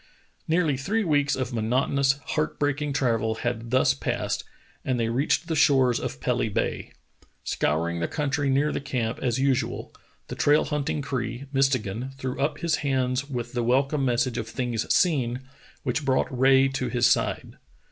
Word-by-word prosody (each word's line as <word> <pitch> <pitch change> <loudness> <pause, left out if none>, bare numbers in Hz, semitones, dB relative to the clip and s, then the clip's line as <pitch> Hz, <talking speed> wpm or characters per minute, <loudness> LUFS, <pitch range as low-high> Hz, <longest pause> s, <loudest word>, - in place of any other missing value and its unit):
Nearly 160 -4 +2
three 210 +11 0
weeks 145 -4 +2
of 130 -1 -3
monotonous, 130 +4 +2 0.2
heart 155 0 -1
breaking 145 0 -1
travel 115 -6 0
had 120 0 -3
thus 130 - +3
passed, 70 - -2 0.4
and 130 -2 -1
they 115 -1 0
reached 135 +8 +1
the 160 - -1
shores 130 -5 +4
of - - -5
Pelly - - 0
Bay. - - -2 0.5
Scouring 85 +3 0
the 85 - -1
country 145 -1 -1
near 140 +3 +2
the - - -3
camp 125 -4 -2
as 120 -2 0
usual, 130 -3 -1 0.3
the - - -6
trail 150 +1 +3
hunting 150 -1 -2
Cree, 125 -1 -3
Mistegan, 130 -2 0
threw 130 -1 -4
up 145 +1 0
his 170 -2 +1
hands 130 -1 -1
with 120 -3 -4
the 120 - 0
welcome 135 +4 +1
message 125 -1 +1
of 115 - -4
things 120 -2 -2
seen, 130 -8 +2 0.4
which 130 +4 -1
brought 130 -1 0
Rae 135 +1 +5
to 135 -1 -2
his 120 -1 +1
side. - - 0
130 Hz, 165 wpm, -25 LUFS, 120-140 Hz, 0.5 s, Rae